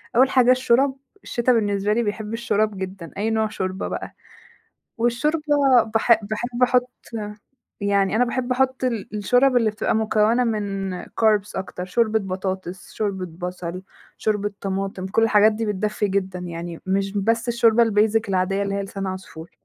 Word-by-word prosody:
أول 260 +2 +5
حاجة 255 -1 +5
الشورَب، 255 +2 +3 0.3
الشِتا 240 +1 +1
بالنسبة 205 -2 +1
لي 235 +2 +1
بيحب 215 +1 -4
الشورَب 215 -3 0
جدًا، 190 -2 -6
أي 210 +2 0
نوع 220 -1 +1
شوربة 190 -2 -3
بقى. - - -6 0.8
والشوربة 240 +7 +1 0.5
باحب 225 -2 +3
باحب 240 +3 -3
أحُط 250 0 +3 0.9
يعني 200 0 +1
أنا 245 - +4
باحب 250 +1 -2
أحُط 260 0 0
ال 230 -4 -2
الشورَب 250 +5 +3
اللي 230 -3 +3
بتبقى 210 0 -1
مكونة 220 +2 +2
من 200 -4 -2
carbs 210 -2 +1
أكتر، 190 -1 -5
شوربة 220 +3 +1
بطاطس، 185 -2 -5
شوربة 195 -4 -2 0.2
بصل، 180 0 -6 0.4
شوربة 205 -1 -1
طماطم، 195 -1 -3
كل 215 +4 +1
الحاجات 215 -1 +5
دي 220 +1 -3
بتدفّي 210 0 -1
جدًا، 190 -1 -1
يعني 170 -1 -6
مش 195 +1 0
بس 225 +4 0
الشوربة 235 -1 +4
الbasic 220 0 +2
العادية 195 +1 0
اللي 200 0 -2
هي 200 - -1
لسان 195 0 -5
عصفور. 185 -3 -7
210 Hz, 155 wpm, -22 LUFS, 195-235 Hz, 0.9 s, أول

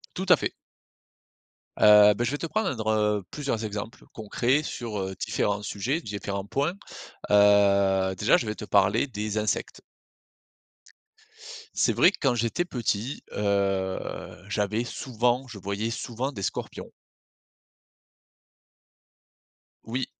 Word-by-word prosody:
Tout 190 - -3
à 180 - +9
fait. - - -3 1.3
Heu, 105 0 +8
beh 120 - -1
je - - -1
vais 145 - -2
te 165 - -3
prendre, 135 - -2
heu, 105 -2 +1
plusieurs 135 -7 -3
exemples 105 +2 -6
concrets 120 +6 0
sur, 115 -7 -5
heu, 95 0 -4
différents 100 0 -1
sujets, 125 - -2
différents 100 -2 -5
points. 145 - -1 0.6
Heu, 100 -2 +4
déjà 105 +5 +3
je 115 - -2
vais 105 - -2
te 105 - -8
parler 100 +6 +3
des 110 -3 -3
insectes. 105 -1 -2 1.9
C'est - - +2
vrai 185 - +5
que - - -9
quand 135 -4 +2
j'étais 120 +9 -1
petit, 120 - -3
heu, 100 -2 0 0.5
j'avais 105 +2 0
souvent 125 +1 -1
je 115 -4 -9
voyais 100 +4 -3
souvent 125 +4 -4
des 100 - -8
scorpions. - - -5 2.9
Oui. 125 +3 -2
110 Hz, 125 wpm, -26 LUFS, 100-125 Hz, 2.9 s, à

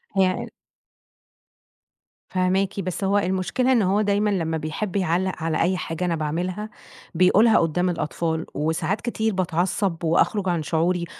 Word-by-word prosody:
هي 190 -1 +4
ال - - -9 1.8
فاهماكِ، 190 +2 0
بس 185 +1 -3
هو 200 +1 +2
المشكلة 190 +7 0
إن 240 -4 +4
هو 195 +2 +2
دايمًا 205 0 +1
لمّا 165 -5 -1
بيحب 160 +6 -4
يعلق 185 0 +1
على 165 -1 0
أي 185 +2 +2
حاجة 170 +1 -3
أنا 170 -2 0
باعملها 175 +7 -3 0.5
بيقولها 200 +6 +5
قدّام 175 +3 +1
الأطفال، 160 0 -2
وساعات 160 +6 -1
كتير 220 -3 -1
باتعصب 180 0 -1
وأخرج 185 +4 +2
عن 170 -3 0
شعوري 170 +3 0
185 Hz, 140 wpm, -23 LUFS, 165-200 Hz, 1.8 s, بيقولها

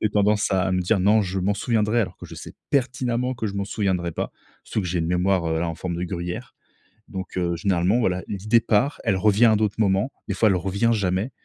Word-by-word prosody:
J'ai 110 - +3
tendance 105 0 +2
à 95 0 +1
me 90 - +1
dire: 95 +4 +2
«Non, 105 +4 +4
je 95 -1 -2
m'en 100 +3 +1
souviendrai», 110 +1 +1
alors 110 - -3
que - - -11
je - - -10
sais - - -10 0.2
pertinemment 125 -1 0
que 110 - -3
je 100 - -3
m'en 100 0 -1
souviendrai 95 -5 -1
pas, - - -3 0.3
surtout - - -2
que 95 - -3
j'ai 90 0 0
une 80 - -1
mémoire, 90 0 +1
heu, 80 0 0
a 85 - -1
en 80 - -3
forme 85 +1 -4
de 90 - -2
gruyère. 85 0 -5 0.5
Donc 95 -1 -6
heu, 85 -1 0
généralement, 90 +4 +1
voilà, 95 -5 0
l'idée 105 +4 +2
part, 115 +5 +1
elle 95 - +1
revient 105 +4 +4
à 110 -1 +5
d'autres 105 -1 0
moments, 100 +4 +1 0.2
des - - -1
fois 110 - +3
elle 95 - +2
revient 100 +6 0
jamais. 100 +1 0
100 Hz, 240 wpm, -23 LUFS, 90-110 Hz, 0.5 s, à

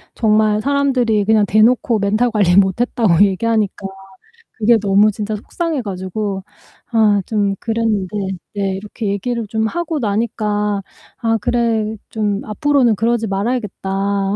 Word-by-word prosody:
정말 215 -1 +2
사람들이 260 -6 +1
그냥 215 -1 +3
대놓고 220 +2 +3
멘탈 215 +4 +1
관리 195 -5 +2
못했다고 200 -1 +3
얘기하니까 205 0 -1 0.7
그게 230 0 +3
너무 205 +1 +3
진짜 210 +1 -4
속상해 315 - -3
가지고 195 0 -4 0.5
아 210 -3 +4
좀 205 -3 0
그랬는데 225 -4 -1 0.5
네 195 -1 -1
이렇게 210 +2 -6
얘기를 225 +3 -2
좀 220 +1 -1
하고 330 +1 -3
나니까 210 -2 -1 0.4
'아 225 -2 0
그래. 225 -2 0
좀 210 -2 -1
앞으로는 245 +1 +2
그러지 230 +1 0
말아야겠다. 200 -2 -2
215 Hz, 295 characters per minute, -18 LUFS, 200-230 Hz, 0.7 s, 아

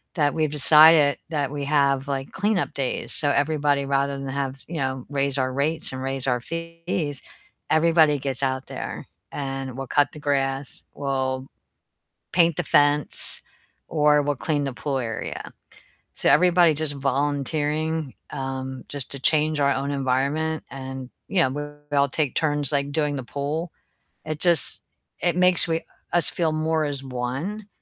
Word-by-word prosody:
that 145 -4 +1
we've 155 -2 -1
decided 150 0 +7
that 145 -4 -2
we 145 -1 -4
have, 140 -1 +1
like, 135 -1 -4
cleanup 205 -1 -1
days. 135 -2 -3
So 145 - +4
everybody 145 -1 0
rather 140 0 -1
than 135 0 -7
have 135 0 -4
you 170 - -6
know, 130 -2 -3
raise 140 -1 -1
our 130 -1 -1
rates 150 +4 -1
and 130 0 -6
raise 135 0 -2
our 125 -1 +1
fees, 165 -1 -4 0.5
everybody 160 -2 +3
gets 135 0 -3
out 130 0 -2
there - - -7 0.2
and 135 -2 -5
we'll 135 0 -6
cut 145 +2 +1
the 150 - -10
grass, 135 -2 +2
we'll 130 -1 -3 0.9
paint 170 -2 +3
the 175 - -1
fence, 145 -1 +4 0.5
or 150 -1 +3
we'll 145 0 -2
clean 145 +1 -2
the 135 - -4
pool 135 +2 -3
area. 115 -3 -6 0.6
So - - 0
everybody 175 0 +4
just 150 -1 +1
volunteering, 145 +2 -2 0.2
um, 130 -1 -6
just 140 -3 -4
to 140 - -3
change 155 +1 +2
our 140 0 +3
own 140 +1 -3
environment 140 +4 -1
and, 130 -1 -8 0.2
you 195 - +1
know, 130 - +1 0.4
we 145 - -1
all 140 0 +3
take 140 -1 -2
turns, 145 -3 0
like, 140 0 -1
doing 150 -1 -1
the 130 - -5
pool. 150 +6 -4 0.6
It 155 -1 -5
just 170 -3 +7 0.4
it 175 -1 +1
makes 180 0 +4
we 165 0 -1 0.3
us 175 - +3
feel 165 -3 -1
more 155 0 -1
as 140 -2 -1
1, 135 +12 -5
145 Hz, 160 wpm, -23 LUFS, 135-155 Hz, 0.9 s, decided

